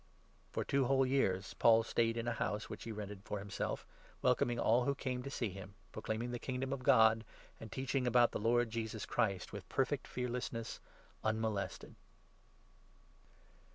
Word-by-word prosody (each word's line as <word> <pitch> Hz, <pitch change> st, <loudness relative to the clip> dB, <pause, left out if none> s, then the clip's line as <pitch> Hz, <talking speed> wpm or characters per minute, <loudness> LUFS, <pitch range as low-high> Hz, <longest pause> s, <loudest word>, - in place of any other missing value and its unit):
For -, -, -2 dB
two 135 Hz, -1 st, +2 dB
whole 135 Hz, +1 st, +4 dB
years 100 Hz, -8 st, +1 dB
Paul 115 Hz, -1 st, +5 dB
stayed 115 Hz, 0 st, +1 dB
in 115 Hz, 0 st, -2 dB
a -, -, +2 dB
house 105 Hz, -1 st, -2 dB
which -, -, -7 dB
he 115 Hz, -, -4 dB
rented 105 Hz, -2 st, -6 dB
30 100 Hz, -, -21 dB
for 105 Hz, -, -2 dB
himself, 100 Hz, 0 st, -3 dB, 0.4 s
welcoming 120 Hz, 0 st, +3 dB
all 120 Hz, +2 st, +3 dB
who 140 Hz, -, +1 dB
came 130 Hz, -2 st, -2 dB
to 140 Hz, -, -5 dB
see 120 Hz, -5 st, -1 dB
him, 95 Hz, +1 st, -9 dB, 0.2 s
proclaiming 110 Hz, +2 st, -3 dB
31 -, -, -4 dB
the 120 Hz, -, -3 dB
Kingdom 130 Hz, +2 st, -2 dB
of 135 Hz, -, -4 dB
God, 110 Hz, -3 st, +6 dB, 0.4 s
and 110 Hz, -2 st, -9 dB
teaching 130 Hz, -1 st, -1 dB
about 120 Hz, 0 st, +5 dB
the -, -, -2 dB
Lord 115 Hz, +1 st, +2 dB
Jesus 110 Hz, -2 st, -3 dB
Christ, 100 Hz, -6 st, 0 dB
with 100 Hz, -4 st, -7 dB
perfect 135 Hz, +1 st, 0 dB
fearlessness, 125 Hz, -2 st, -3 dB, 0.4 s
unmolested. 110 Hz, -2 st, -1 dB
115 Hz, 170 wpm, -36 LUFS, 110-125 Hz, 0.4 s, God